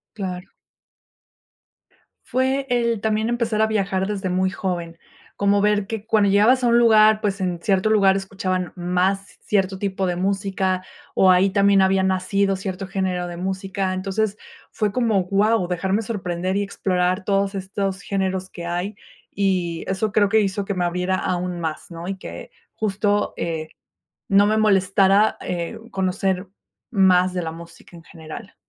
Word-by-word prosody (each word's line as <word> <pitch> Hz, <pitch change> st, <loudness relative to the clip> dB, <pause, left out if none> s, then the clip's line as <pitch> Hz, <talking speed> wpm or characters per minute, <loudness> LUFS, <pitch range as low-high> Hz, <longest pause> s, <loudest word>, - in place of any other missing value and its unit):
Claro. 185 Hz, -2 st, -5 dB, 1.8 s
Fue 265 Hz, +1 st, 0 dB
el, 235 Hz, -3 st, +1 dB
también 220 Hz, +1 st, 0 dB
empezar 235 Hz, -2 st, 0 dB
a 220 Hz, -, +4 dB
viajar 195 Hz, -3 st, 0 dB
desde 200 Hz, -2 st, -3 dB
muy 185 Hz, +1 st, +1 dB
joven, 170 Hz, -3 st, -4 dB, 0.4 s
como 200 Hz, 0 st, +2 dB
ver 205 Hz, -1 st, +2 dB
que 220 Hz, -1 st, -5 dB
cuando 215 Hz, -3 st, +3 dB
llegabas 220 Hz, +6 st, +4 dB
a -, -, +3 dB
un 235 Hz, 0 st, +4 dB
lugar, 215 Hz, -2 st, +5 dB
pues, 205 Hz, -2 st, -1 dB
en 180 Hz, -2 st, -2 dB
cierto 195 Hz, +2 st, +1 dB
lugar 195 Hz, -3 st, +4 dB
escuchaban 185 Hz, -2 st, -3 dB
más 185 Hz, +2 st, -1 dB
cierto 195 Hz, -2 st, 0 dB
tipo 195 Hz, -1 st, -1 dB
de 180 Hz, -1 st, -1 dB
música, 190 Hz, -1 st, -1 dB, 0.3 s
o 185 Hz, -, +6 dB
ahí 185 Hz, +2 st, +4 dB
también 200 Hz, 0 st, +4 dB
había 190 Hz, 0 st, +3 dB
nacido 195 Hz, +1 st, +1 dB
cierto 190 Hz, 0 st, -5 dB
género 185 Hz, -1 st, -2 dB
de 175 Hz, 0 st, -7 dB
música, 190 Hz, +1 st, -2 dB
entonces 195 Hz, +2 st, -2 dB, 0.3 s
fue 210 Hz, -2 st, -1 dB
como: 225 Hz, -5 st, +1 dB
"¡Guau!", 200 Hz, +1 st, +2 dB
dejarme 190 Hz, +4 st, 0 dB
sorprender 185 Hz, -4 st, -3 dB
y 205 Hz, -, +1 dB
explorar 185 Hz, -1 st, -1 dB
todos 195 Hz, 0 st, 0 dB
estos 195 Hz, 0 st, -3 dB
géneros 190 Hz, -2 st, -2 dB
que 170 Hz, -2 st, -8 dB
hay, 175 Hz, +4 st, -3 dB, 0.4 s
y 180 Hz, -4 st, 0 dB
eso 195 Hz, +3 st, -1 dB
creo 205 Hz, -1 st, +3 dB
que 220 Hz, +1 st, +4 dB
hizo 200 Hz, 0 st, -1 dB
que 200 Hz, -, -2 dB
me 180 Hz, -2 st, -1 dB
abriera 180 Hz, +2 st, 0 dB
aún 180 Hz, -1 st, -2 dB
más, 160 Hz, -2 st, -4 dB
¿no? 170 Hz, 0 st, -8 dB
Y 195 Hz, 0 st, -3 dB
que -, -, -9 dB, 0.2 s
justo, 205 Hz, 0 st, 0 dB
eh, 160 Hz, -2 st, -3 dB, 0.6 s
no 200 Hz, +1 st, +5 dB
me 215 Hz, +1 st, +2 dB
molestara, 195 Hz, 0 st, +3 dB
eh, 170 Hz, -1 st, -4 dB
uh, 230 Hz, +1 st, -14 dB
conocer 190 Hz, 0 st, -1 dB, 0.4 s
más 185 Hz, -4 st, +4 dB
de 180 Hz, -, -1 dB
la 160 Hz, -, -3 dB
música 170 Hz, +1 st, -13 dB
en 165 Hz, -, -14 dB
general. 165 Hz, +6 st, -10 dB
195 Hz, 160 wpm, -22 LUFS, 185-205 Hz, 1.8 s, o